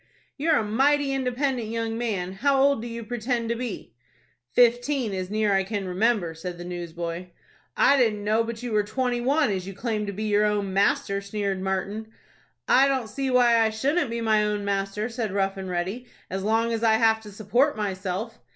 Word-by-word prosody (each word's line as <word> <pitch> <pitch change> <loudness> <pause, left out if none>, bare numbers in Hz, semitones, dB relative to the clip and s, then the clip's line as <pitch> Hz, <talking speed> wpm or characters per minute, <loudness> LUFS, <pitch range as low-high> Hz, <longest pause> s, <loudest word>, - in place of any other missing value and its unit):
"You're 315 +2 +2
a - - +1
mighty 275 +6 +2
independent 255 -2 -1
young 225 0 -2
man. 205 -6 -2
How 275 +7 +2
old 275 -3 +3
do 235 - -5
you 230 0 -6
pretend 235 0 -2
to 235 - 0
be?" 230 - -6 0.6
"Fifteen, 245 -1 +2
as 185 -1 -3
near 215 0 +1
as 195 - +4
I - - 0
can 200 -1 -3
remember," 190 -2 +1
said 175 +2 -7
the 175 - -8
newsboy. 175 0 -5 0.5
"I 280 - +5
didn't 220 -5 +2
know 215 +2 +2
but 230 0 -6
you 245 - -4
were 210 -1 +3
twenty 245 +3 -1
one, 280 0 +2
as 190 -1 -3
you 195 - -7
claim 215 -1 -2
to - - -2
be 205 +2 -5
your 210 -1 +2
own 205 -2 0
master," 200 0 +1
sneered 200 -1 -3
Martin. 195 +3 -2 0.6
"I 270 +2 +5
don't 260 -5 -1
see 270 +4 -2
why 245 -2 +5
I 225 -1 +4
shouldn't 275 +7 0
be 235 0 -3
my 215 -1 +3
own 210 -1 -1
master," 200 +1 -1
said 230 -4 -3
Rough 195 -1 0
and 190 -1 -6
Ready, 185 +8 -3 0.2
"as 190 +1 -2
long 225 +3 +1
as 225 0 -2
I 225 -1 +5
have 220 0 +3
to 210 -1 -11
support 225 +8 +1
myself." 190 -3 -3
220 Hz, 205 wpm, -25 LUFS, 195-245 Hz, 0.6 s, I